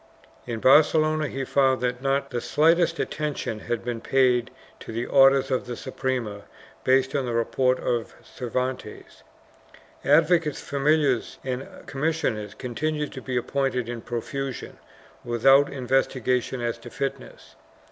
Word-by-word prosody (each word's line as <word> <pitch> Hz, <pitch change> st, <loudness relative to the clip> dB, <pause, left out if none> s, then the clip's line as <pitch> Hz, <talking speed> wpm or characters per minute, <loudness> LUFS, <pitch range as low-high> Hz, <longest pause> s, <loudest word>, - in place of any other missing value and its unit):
In 115 Hz, -2 st, -3 dB
Barcelona 155 Hz, +2 st, +4 dB
he 135 Hz, 0 st, -4 dB
found 135 Hz, -1 st, +2 dB
that 125 Hz, 0 st, -1 dB
not 140 Hz, 0 st, 0 dB
the 120 Hz, -2 st, -2 dB
slightest 165 Hz, +2 st, +3 dB
attention 150 Hz, -7 st, -3 dB
had 120 Hz, +1 st, -4 dB
been 120 Hz, -2 st, -3 dB
paid 125 Hz, -2 st, +2 dB, 0.3 s
to -, -, -9 dB
the 115 Hz, +2 st, -3 dB
orders 135 Hz, 0 st, +5 dB
of 130 Hz, -1 st, -1 dB
the 120 Hz, -, -4 dB
Suprema 115 Hz, -6 st, -4 dB, 0.4 s
based 130 Hz, +1 st, +2 dB
on 135 Hz, -3 st, 0 dB
the 120 Hz, -, -2 dB
report 125 Hz, +2 st, +1 dB
of 120 Hz, -2 st, -2 dB
Cervantes. 125 Hz, -2 st, -5 dB, 0.8 s
Advocates, 155 Hz, +1 st, +3 dB
familiars 140 Hz, -2 st, +1 dB
and 130 Hz, 0 st, -4 dB, 0.2 s
commissioners 135 Hz, -8 st, -2 dB
continued 150 Hz, +4 st, -3 dB
to 130 Hz, -, -8 dB
be 130 Hz, -1 st, -3 dB
appointed 125 Hz, -1 st, -1 dB
in 120 Hz, -1 st, -5 dB
profusion, 130 Hz, +3 st, -5 dB, 0.4 s
with 120 Hz, 0 st, -4 dB
out 135 Hz, +1 st, +6 dB
investigation 130 Hz, -1 st, 0 dB
as 120 Hz, 0 st, -2 dB
to 120 Hz, -, -10 dB
fitness. 135 Hz, +2 st, -6 dB
130 Hz, 135 wpm, -25 LUFS, 120-140 Hz, 0.8 s, out